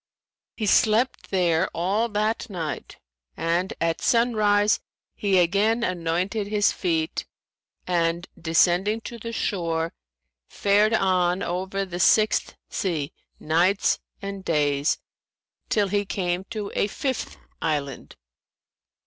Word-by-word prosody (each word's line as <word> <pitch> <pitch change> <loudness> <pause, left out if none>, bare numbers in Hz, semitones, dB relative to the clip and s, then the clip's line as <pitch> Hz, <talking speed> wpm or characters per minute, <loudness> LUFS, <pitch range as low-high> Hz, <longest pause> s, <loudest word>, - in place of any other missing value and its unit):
He 220 - -1
slept 225 +4 +2
there 180 -2 +2
all 200 +7 +1
that 215 +3 -1
night 165 -6 -5 0.4
and 170 +3 0
at 165 0 0
sunrise 215 -3 +3 0.3
he 195 -2 +1
again 205 +7 +3
anointed 185 +3 -1
his 205 0 +2
feet 165 -4 -1 0.6
and, 170 0 0
descending 175 +6 +2
to 235 +1 -8
the 230 +1 -5
shore, 170 -7 -1 0.6
fared 210 +2 +3
on 185 -2 +2
over 190 +3 -2
the 180 -2 -6
Sixth 215 +4 +3
Sea 160 -7 -2 0.3
nights 175 +6 +2 0.2
and 200 -1 -5
days, 145 -3 +1 0.7
till 205 -2 +2
he 205 +1 +1
came 185 -2 -2
to 210 -2 -5
a - - +1
fifth 260 +4 -3 0.2
island. 145 -5 -3
190 Hz, 110 wpm, -25 LUFS, 170-210 Hz, 0.7 s, sunrise